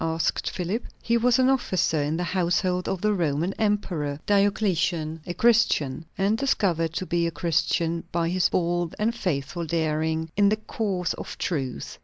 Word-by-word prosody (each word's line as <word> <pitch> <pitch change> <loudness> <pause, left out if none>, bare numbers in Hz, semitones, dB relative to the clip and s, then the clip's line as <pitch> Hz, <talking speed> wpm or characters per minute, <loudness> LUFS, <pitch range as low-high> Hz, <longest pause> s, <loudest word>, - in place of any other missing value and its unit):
asked 165 0 0
Philip. 190 +6 -3 0.2
"He 235 - 0
was 240 +1 +3
an 260 0 +4
officer 190 - +1
in 150 +3 -1
the 180 - -1
household 180 +1 0
of 190 - -2
the 210 0 +2
Roman 170 0 0
emperor, 175 -9 -1
Diocletian; 185 -6 +1
a 175 - -2
Christian; 165 - +2
and 200 +3 +1
discovered 170 - +1
to 185 - -3
be 170 0 +1
a - - -2
Christian 165 +1 0
by 165 -1 0
his 185 +1 +2
bold 175 -1 0
and 220 +2 +1
faithful 170 -5 -2
daring 160 0 -1
in 200 0 +4
the 215 - +3
cause 200 -5 -2
of - - -8
truth. 135 -8 -3
175 Hz, 165 wpm, -25 LUFS, 160-205 Hz, 0.2 s, an